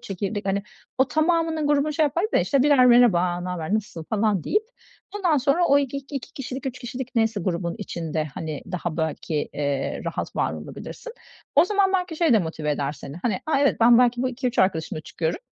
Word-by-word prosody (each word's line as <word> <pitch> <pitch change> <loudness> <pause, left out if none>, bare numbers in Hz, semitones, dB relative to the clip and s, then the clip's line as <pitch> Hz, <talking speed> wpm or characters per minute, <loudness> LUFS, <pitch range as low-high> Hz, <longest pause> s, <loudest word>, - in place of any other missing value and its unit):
çekirdek, 200 +1 -4
hani, 195 +1 0 0.4
o 265 +1 +3
tamamının 320 -1 +1
grubunu 295 +1 +2
şey 315 - +1
yapardık 335 +9 0
da, - - +4
işte, 275 -2 +2
birer, 280 -4 +5
"Merhaba 180 -8 +4
ne 180 - -5
haber, 180 +2 -2
nasılsın?" 195 -7 -4
falan, 210 -4 +1
deyip 420 +1 +1 0.5
ondan 355 -7 +2
sonra 285 +6 +2
o 280 -2 +5
iki 280 -1 -2
iki 275 -1 -6
kişilik, 270 0 -6
3 265 0 -4
kişilik 250 +1 -6
neyse 225 -3 +1
grubun 170 -1 -2
içinde, 165 -6 -3
hani, 155 -3 -5
daha 175 -2 -3
belki, 160 -1 -2
eee, 140 -2 -2
rahat - - -4
var - - 0
olabilirsin. 475 -2 -8 0.4
O 300 - +7
zaman 395 0 +2
belki 360 -3 -1
şey 325 -5 +3
de 220 - +6
motive 160 -4 -3
eder 145 -1 -1
seni, 140 0 -9
hani, 190 +1 -2
"a, 310 -3 +2
evet 280 - +3
ben 235 +1 +7
belki 245 0 +3
bu 260 - +1
2-3 250 -1 -3
arkadaşımla 160 -4 +1
çıkıyorum, 160 +1 -3
235 Hz, 195 wpm, -24 LUFS, 175-285 Hz, 0.5 s, O